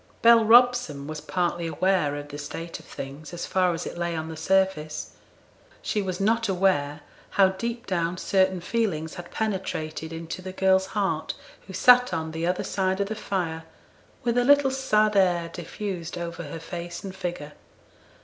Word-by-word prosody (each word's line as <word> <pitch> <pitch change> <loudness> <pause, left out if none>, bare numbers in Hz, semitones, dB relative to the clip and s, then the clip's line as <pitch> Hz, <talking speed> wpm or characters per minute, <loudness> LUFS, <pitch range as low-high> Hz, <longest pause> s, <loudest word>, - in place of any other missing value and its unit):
Bell 230 -1 +8
Robson 235 - +5
was 155 0 -6
partly 175 -2 -1
aware 180 -4 +1
of 145 0 -7
the 145 0 -7
state 165 +3 -6
of - - -16
things, 145 +5 -8
as 175 - -4
far 185 -1 +2
as 165 0 -4
it - - -6
lay 170 -1 -1
on 160 0 -4
the 160 - -6
surface. 160 -2 0 0.7
She 210 - 0
was 185 -2 -3
not 225 +2 +2
aware 170 -6 +1 0.4
how 195 -1 +7
deep 235 +5 -4
down 175 -3 -1
certain 190 -1 +2
feelings 175 -7 -1
had 175 -1 -9
penetrated 180 -7 -3
into 165 +2 -6
the 185 0 -7
girl's 190 0 +3
heart 195 -6 0 0.3
who 190 - -9
sat 250 +6 +6
on 160 0 -3
the 165 +1 -2
other 180 0 0
side 190 0 0
of 200 0 0
the 220 - -3
fire, 170 -6 -3 0.6
with 240 0 +2
a - - +3
little 285 +1 +5
sad 215 -6 +2
air 175 -3 +3
diffused 175 -1 -5
over 170 -1 -5
her 150 +3 -7
face 170 +1 -6
and 190 -1 -7
figure. 175 -6 -5
180 Hz, 175 wpm, -26 LUFS, 165-200 Hz, 0.7 s, Bell